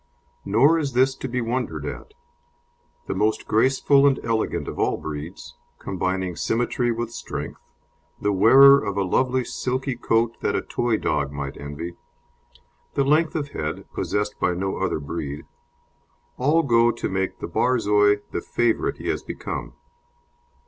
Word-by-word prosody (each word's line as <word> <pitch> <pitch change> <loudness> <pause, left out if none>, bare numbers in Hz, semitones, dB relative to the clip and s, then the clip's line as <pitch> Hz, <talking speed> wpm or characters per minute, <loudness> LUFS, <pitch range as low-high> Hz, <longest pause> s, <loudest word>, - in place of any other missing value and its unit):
Nor 135 +11 +4
is 140 -4 -2
this 130 +2 +3
to - - -5
be 125 0 -2
wondered 125 +2 -2
at. 425 - -7 0.9
The - - -3
most 110 0 0
graceful 135 +4 +4
and 135 -2 +2
elegant 110 -9 -1
of - - -6
all - - +1
breeds, 80 +3 -7 0.2
combining 95 -1 -2
symmetry 120 +3 0
with 115 0 -3
strength, - - -6 0.6
the 105 - 0
wearer 135 +8 +7
of 100 -1 -3
a 100 - +2
lovely 130 +7 +1
silky 130 +2 -2
coat 115 -1 0
that - - 0
a - - -1
toy 120 -2 0
dog 70 -7 -1
might 70 -1 -5
envy, 75 +5 -7 1.0
the 140 - +3
length 155 +4 +2
of 145 -3 -2
head, 75 - -4
possessed 105 0 -2
by 90 -1 +1
no 95 +2 -2
other - - -1
breed 75 -1 -5 0.9
all 150 +6 +2
go 120 -3 +4
to 120 0 -2
make 95 0 -2
the - - -5
Borzoi 105 -4 +2
the - - -2
favourite 120 -1 0
he - - -7
has - - -1
become. - - -6
115 Hz, 150 wpm, -23 LUFS, 95-130 Hz, 1.0 s, wearer